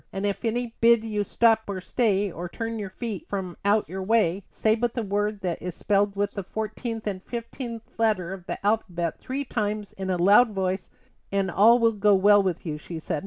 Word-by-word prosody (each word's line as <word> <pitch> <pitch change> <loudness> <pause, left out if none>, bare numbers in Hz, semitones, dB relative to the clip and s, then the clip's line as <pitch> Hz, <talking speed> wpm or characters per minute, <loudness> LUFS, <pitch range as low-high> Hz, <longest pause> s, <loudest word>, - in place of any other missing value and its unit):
"And 195 +1 -3
if 200 -1 -2
any 235 0 -1
bid 230 -1 +5
you 210 -2 -1
stop 225 +2 +3
or 200 -2 -3
stay, 200 0 +1
or 175 +2 -6
turn 225 +3 -4
your 200 -2 -4
feet 215 0 -6
from 190 -3 -4
out 205 +1 +2
your 190 +1 -5
way, 200 -2 +2
say 220 - +1
but 235 +1 -1
the 235 - -1
word 205 +1 -1
that 180 -3 -3
is 180 -2 -5
spelled 200 -1 +1
with 205 0 0
the 200 - -4
fourteenth 220 +3 -5
and 195 -3 -3
fifteenth 235 +1 -6 0.2
letters 195 -4 0
of 175 - -24
the - - -5
alphabet 180 -6 0
three 270 +2 -4
times 210 -3 -3
in 190 -1 -5
a 185 - +1
loud 205 +6 +5
voice, 190 -1 -2 0.4
and 195 -2 0
all 220 +7 +6
will 230 -1 +3
go 210 -1 +3
well 205 +2 +6
with 185 -3 -2
you," 150 -2 -4
she 165 +2 -7
said. 155 -1 -3
205 Hz, 215 wpm, -25 LUFS, 190-225 Hz, 0.4 s, all